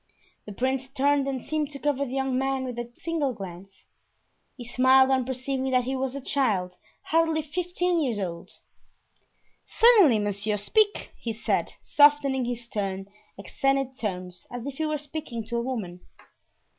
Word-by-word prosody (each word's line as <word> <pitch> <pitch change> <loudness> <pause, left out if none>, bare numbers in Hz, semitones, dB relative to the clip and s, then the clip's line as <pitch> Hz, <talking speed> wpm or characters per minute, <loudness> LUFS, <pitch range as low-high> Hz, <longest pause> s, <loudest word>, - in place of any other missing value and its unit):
The - - -6
prince 260 +4 -1
turned 280 +1 +2
and 265 -3 -3
seemed 310 -2 -1
to 285 - -8
cover 280 -1 0
the 260 0 -5
young 265 -1 0
man 270 0 0
with 245 -2 -5
a 240 0 -6
single 315 -6 0
glance; 195 -1 -10 0.7
he 245 - -8
smiled 260 +1 +5
on 260 -2 +2
perceiving 265 +1 -2
that 255 -1 +3
he 260 +2 -2
was 265 0 -2
a 280 - -5
child 205 -11 0 0.3
hardly 325 -1 +1
fifteen 355 +2 -1
years 245 -7 0
old. 170 -4 -5 1.1
"Certainly, 420 - +6
monsieur, 205 0 -1
speak," 415 - +1
he 230 - -3
said, 220 - -1
softening 290 -3 +4
his 240 0 -4
stern, 195 -4 -3 0.3
accented 270 +4 0
tones, 180 -4 -5
as 245 0 -6
if 280 0 -6
he 315 - 0
were 305 0 -1
speaking 290 -5 -6
to 235 +2 -3
a - - 0
woman. 220 -8 -4
260 Hz, 160 wpm, -26 LUFS, 225-285 Hz, 1.1 s, Certainly